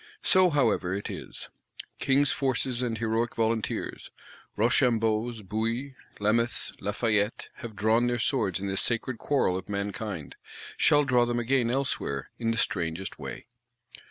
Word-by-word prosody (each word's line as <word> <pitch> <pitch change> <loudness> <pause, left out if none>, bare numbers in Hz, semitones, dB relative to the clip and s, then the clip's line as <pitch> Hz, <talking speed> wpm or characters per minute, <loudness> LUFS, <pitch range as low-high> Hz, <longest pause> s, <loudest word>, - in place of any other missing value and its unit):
So, 185 -1 +5
however, 115 - +1
it 100 - -4
is. - - -7 0.5
King's 140 +1 +3
forces 130 -2 0
and 120 -3 -1
heroic 115 +1 -1
volunteers; 115 -1 -1 0.5
Rochambeaus, 115 -1 +2
Bouillés, 115 +7 -2 0.3
Lameths, 115 +3 +2
Lafayettes, 105 0 0
have 115 -5 -8
drawn 110 +4 +3
their 120 0 0
swords 115 - 0
in 100 - -4
this 95 0 0
sacred 120 +1 -1
quarrel 135 -10 +1
of 95 +1 -6
mankind;—shall 100 - -1
draw 125 -3 +3
them 120 0 -1
again 120 0 +1
elsewhere, 120 - -1
in 115 -1 0
the 115 - 0
strangest 85 -1 -2
way. - - -7
115 Hz, 130 wpm, -28 LUFS, 105-125 Hz, 0.5 s, So